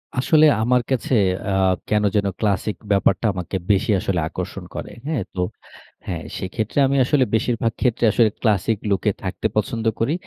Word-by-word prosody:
আসলে 155 +4 +4 0.2
আমার 125 +2 +3
কাছে 130 0 0 0.4
আ - - 0 0.4
কেন 105 0 +2
যেন 100 -1 +2
ক্লাসিক 105 0 0 0.2
ব্যাপারটা 100 +3 +2
আমাকে 90 +1 -5 0.2
বেশি 100 +3 +2
আসলে 90 -2 -1
আকর্ষণ - - -6
করে। - - -6 0.2
হ্যাঁ? 150 -9 -1
তো 95 - -6 0.7
হ্যাঁ, - - -4
সেইক্ষেত্রে 110 +7 -2
আমি 140 - 0
আসলে 135 -1 +3
বেশিরভাগ 115 0 0
ক্ষেত্রে 120 -2 +2
আসলে 115 0 +4
classic 110 -1 +1
look 100 -3 +1
এ - - +2
থাকতে - - -2
পছন্দ 115 -1 -1
করি। 125 +7 +1
110 Hz, 165 wpm, -21 LUFS, 100-125 Hz, 0.7 s, আসলে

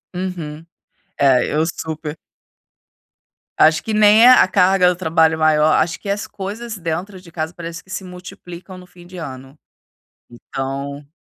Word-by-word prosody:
Uhum. 165 -4 -5 0.5
É, 130 -3 +4
eu 155 +1 +2
super. 155 -1 -5 1.4
Acho 160 +1 +5
que 220 - -3
nem 215 +2 +6
é - - +9
a 255 - +6
carga 185 -1 +4
do 180 - -2
trabalho 160 -2 +2
maior, 155 0 +3
acho 170 +1 +1
que 200 - -8
as 200 +1 -2
coisas 215 +3 -6
dentro 180 +3 -5
de 175 -2 -16
casa, 160 0 -4
parece 165 -1 -8
que 190 - -27
se 190 - -5
multiplicam 180 0 -11
no 180 - -13
fim 175 -1 -17
de 185 - -13
ano. 135 -4 -9 0.7
Então 140 +3 -6
170 Hz, 155 wpm, -19 LUFS, 155-185 Hz, 1.4 s, é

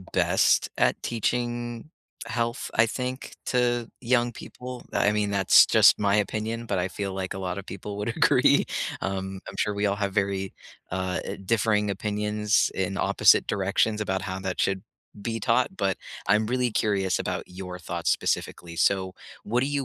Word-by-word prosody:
best 95 - +2
at - - +2
teaching 120 +2 -2 0.4
health, 115 +1 -2
I 110 - +5
think, 125 +2 -4
to 120 -2 +1
young 120 -1 +1
people. 125 +2 -9
I 105 - +2
mean, 105 -1 0
that's 100 -2 +6
just - - +6
my 100 0 +3
opinion, 110 +2 -2
but 100 -4 -1
I 90 - -1
feel 100 +1 -4
like 95 -1 -3
a 95 - -6
lot 90 -1 -3
of 100 0 -7
people 100 +1 -7
would 105 - -2
agree. - - +4 0.3
Um, 95 0 -3
I'm - - -8
sure 105 - 0
we 100 +1 0
all 100 - +1
have 100 -1 -2
very, 95 -1 -1 0.4
uh, 95 0 -2
eh, - - -5
differing 105 0 +2
opinions 105 +1 0
in - - -2
opposite - - +4
directions 105 +2 +1
about 95 -3 -1
how 95 0 -4
that 95 -1 -3
should 95 -1 0 0.4
be 115 +1 -2
taught, 105 - +1
but - - 0 0.3
I'm 105 +1 +3
really 125 0 0
curious 95 -5 +1
about - - -3
your 90 0 -8
thoughts 85 0 -2
specifically. 85 -1 -2
So 95 +2 +1 0.3
what 120 +4 +1
do 135 - +1
you 140 -1 -1
105 Hz, 170 wpm, -26 LUFS, 95-115 Hz, 0.4 s, that's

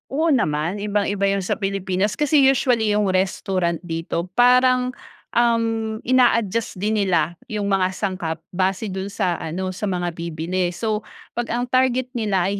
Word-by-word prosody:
Oo 310 +5 +1
naman, 170 - +1
ibang-iba 205 -1 -1
yun 195 0 +2
sa 185 - -1
Pilipinas 195 +1 -1
kasi 295 -1 +4
usually 250 -5 +3
yung 205 -1 +2
restaurant 185 -2 0
dito 170 0 -3
parang, 250 +1 +4 0.4
um, 225 -2 +1
ina-adjust 230 -3 +2
din 210 +3 0
nila 175 -4 +1
yung 205 -2 -2
mga 190 -1 +1
sangkap 175 -6 -3
base 190 +3 -1
do'n 190 +1 -4
sa 195 -4 -1
ano 185 +4 -3
sa 195 +3 -4
mga 175 -2 -1
bibili, 170 +2 -2
so 215 +1 -1 0.3
pag 240 0 -3
ang 240 +1 -1
target 255 0 +1
nila 200 -6 0
ay 200 - -2
200 Hz, 155 wpm, -22 LUFS, 185-230 Hz, 0.4 s, kasi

